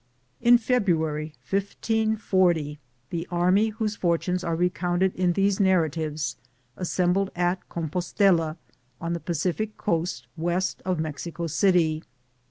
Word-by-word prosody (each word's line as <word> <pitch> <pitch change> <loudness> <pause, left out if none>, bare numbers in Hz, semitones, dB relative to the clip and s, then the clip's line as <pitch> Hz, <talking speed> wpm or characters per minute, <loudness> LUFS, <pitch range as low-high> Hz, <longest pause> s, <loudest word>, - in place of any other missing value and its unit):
In 240 0 +7
February, 160 -11 0
1540, 195 -6 +1 0.3
the 170 0 -3
army 180 +5 +3
whose 215 -1 -2
for 170 -4 +2
tunes 180 +1 -2
are 165 -1 -1
recounted 180 +1 +1
in 180 -1 +1
these 195 +1 +2
narratives 160 -5 +1 0.4
as 180 - -4
sembled 185 +2 +1
at 175 +1 -1
Compostela, 170 0 +1 0.4
on 170 0 -2
the 170 - -2
Pacific 175 +7 -2
coast 165 - -1
west 175 +3 -1
of 185 -3 0
Mexico 160 +2 -4
city. 165 -2 +2
175 Hz, 120 wpm, -26 LUFS, 165-195 Hz, 0.4 s, In